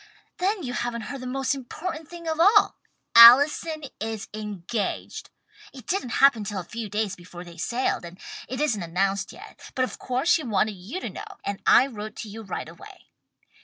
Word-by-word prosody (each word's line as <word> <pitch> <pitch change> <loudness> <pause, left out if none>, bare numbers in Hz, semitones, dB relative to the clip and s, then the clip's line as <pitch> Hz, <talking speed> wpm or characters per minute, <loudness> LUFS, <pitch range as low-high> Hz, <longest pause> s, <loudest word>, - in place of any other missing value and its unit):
Then 385 +1 0
you 250 -2 -4
haven't 240 -1 -3
heard 275 - -7
the 255 - -6
most 270 +1 -1
important 310 +4 -6
thing 340 -1 -9
of 320 0 -2
all! 410 +4 +5 0.4
Allison 285 +7 +8 0.2
is 220 -1 -5
engaged! 210 -1 -4 0.4
It 260 -2 -12
didn't 360 -9 -2
happen 275 -6 +6
till 205 -1 -4
a - - -5
few 220 +4 -6
days 210 -1 -1
before 175 -1 -11
they 175 -1 -13
sailed, 240 +6 -1
and 175 +2 -10 0.3
it 255 - -4
isn't 245 -9 0
announced 195 +4 -1
yet, - - -13 0.2
but 255 - +2
of - - -9
course 255 +4 -2
she 330 - +4
wanted 220 -5 +1
you 200 - -7
to - - -4
know 415 -2 -9
and 200 0 -3
I - - +7
wrote 215 -4 -7
to 220 - -7
you 220 +2 -8
right 200 - -5
away." - - -14
235 Hz, 190 wpm, -25 LUFS, 205-290 Hz, 0.4 s, Allison